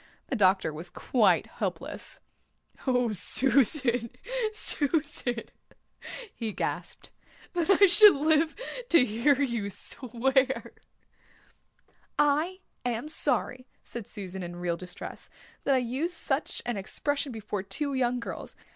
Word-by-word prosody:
The -, -, 0 dB
doctor 190 Hz, -5 st, +3 dB
was 165 Hz, +3 st, -7 dB
quite 225 Hz, +5 st, +2 dB
helpless. -, -, -5 dB, 0.7 s
"Oh, 250 Hz, -3 st, +2 dB
Susan, 250 Hz, -, +2 dB, 0.4 s
Susan," 290 Hz, -, 0 dB, 0.9 s
he 225 Hz, -2 st, -3 dB
gasped. -, -, -4 dB, 0.4 s
"That 345 Hz, 0 st, 0 dB
I 400 Hz, +1 st, +7 dB
should 400 Hz, 0 st, +8 dB
live 310 Hz, +2 st, +2 dB, 0.3 s
to 335 Hz, -7 st, +6 dB
hear 250 Hz, +5 st, +2 dB
you 235 Hz, -7 st, -1 dB
swear." 265 Hz, +5 st, -1 dB, 1.4 s
"I 305 Hz, +6 st, +2 dB, 0.2 s
am 245 Hz, +4 st, -2 dB
sorry," 255 Hz, -4 st, 0 dB, 0.2 s
said 235 Hz, -4 st, -6 dB
Susan 190 Hz, -3 st, -6 dB
in 175 Hz, -1 st, -6 dB
real 175 Hz, -1 st, -1 dB
distress, 180 Hz, +1 st, -8 dB, 0.4 s
"that 275 Hz, -, +4 dB
I -, -, +4 dB
used 260 Hz, +8 st, -2 dB
such 285 Hz, -2 st, -2 dB
an 240 Hz, -3 st, -2 dB
expression 280 Hz, +8 st, -2 dB
before 210 Hz, -3 st, -4 dB
two 240 Hz, +9 st, -3 dB
young 250 Hz, -1 st, +1 dB
girls. 230 Hz, -, -7 dB
250 Hz, 115 wpm, -28 LUFS, 215-290 Hz, 1.4 s, should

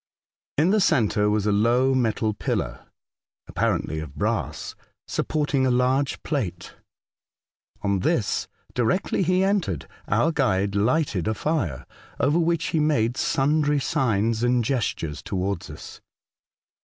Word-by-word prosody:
In 160 Hz, +6 st, +4 dB
the 215 Hz, -, +3 dB
centre 110 Hz, -, +2 dB
was 105 Hz, -1 st, +1 dB
a 105 Hz, -, +2 dB
low 120 Hz, +6 st, +3 dB
metal 110 Hz, -3 st, +1 dB
pillar -, -, -3 dB, 0.6 s
(apparently 80 Hz, -, -1 dB
of 75 Hz, -3 st, -8 dB
brass) -, -, -2 dB, 0.3 s
supporting 145 Hz, -3 st, 0 dB
a 130 Hz, -, +3 dB
large 130 Hz, +2 st, +1 dB
plate. 95 Hz, -, -3 dB, 1.1 s
On 100 Hz, -1 st, +1 dB
this, -, -, 0 dB, 0.3 s
directly 125 Hz, +14 st, 0 dB
he 185 Hz, +1 st, +2 dB
entered, 190 Hz, -, 0 dB, 0.2 s
our 120 Hz, +11 st, +2 dB
guide 100 Hz, -10 st, +1 dB
lighted 105 Hz, -, +1 dB
a 110 Hz, -, 0 dB
fire, 105 Hz, -, -2 dB, 0.3 s
over 150 Hz, +4 st, +3 dB
which 170 Hz, 0 st, +1 dB
he 160 Hz, -, +1 dB
made 125 Hz, -6 st, +2 dB
sundry 145 Hz, +2 st, +1 dB
signs 115 Hz, -4 st, 0 dB
and 120 Hz, 0 st, +2 dB
gestures 85 Hz, -, -2 dB
towards 95 Hz, -1 st, -3 dB
us. -, -, -10 dB
125 Hz, 125 wpm, -24 LUFS, 100-150 Hz, 1.1 s, In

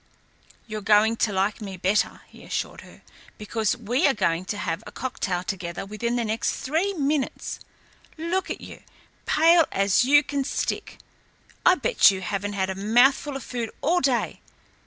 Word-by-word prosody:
"You're 215 Hz, -2 st, -5 dB
going 210 Hz, +2 st, +4 dB
to 215 Hz, -, +1 dB
like 200 Hz, +3 st, 0 dB
me 195 Hz, -3 st, -6 dB
better," 190 Hz, +4 st, 0 dB
he -, -, -16 dB
assured -, -, -4 dB
her, -, -, -16 dB, 0.3 s
"because 215 Hz, +2 st, -1 dB
we 245 Hz, -, +1 dB
are 275 Hz, -, +2 dB
going 175 Hz, -3 st, 0 dB
to 205 Hz, -, -4 dB
have 165 Hz, -, -3 dB
a -, -, -9 dB
cocktail 190 Hz, -8 st, -3 dB
together 180 Hz, -1 st, -5 dB
within 235 Hz, +4 st, -3 dB
the 240 Hz, -1 st, 0 dB
next 220 Hz, +1 st, -1 dB
three 320 Hz, +9 st, -1 dB
minutes. 285 Hz, -2 st, -2 dB, 0.6 s
Look 340 Hz, +4 st, -2 dB
at -, -, -5 dB
you -, -, -11 dB, 0.5 s
pale 330 Hz, +1 st, +5 dB
as 195 Hz, +3 st, +3 dB
you 290 Hz, +3 st, +5 dB
can 285 Hz, -2 st, -2 dB
stick. -, -, -3 dB, 0.7 s
I 365 Hz, -, +6 dB
bet -, -, +5 dB
you 190 Hz, -1 st, -2 dB
haven't 200 Hz, +2 st, -3 dB
had 190 Hz, -1 st, -1 dB
a -, -, -2 dB
mouthful 245 Hz, +8 st, +3 dB
of 270 Hz, -, -5 dB
food 235 Hz, -3 st, -4 dB
all 350 Hz, +4 st, +2 dB
day. 260 Hz, -3 st, 0 dB
225 Hz, 170 wpm, -25 LUFS, 200-280 Hz, 0.7 s, I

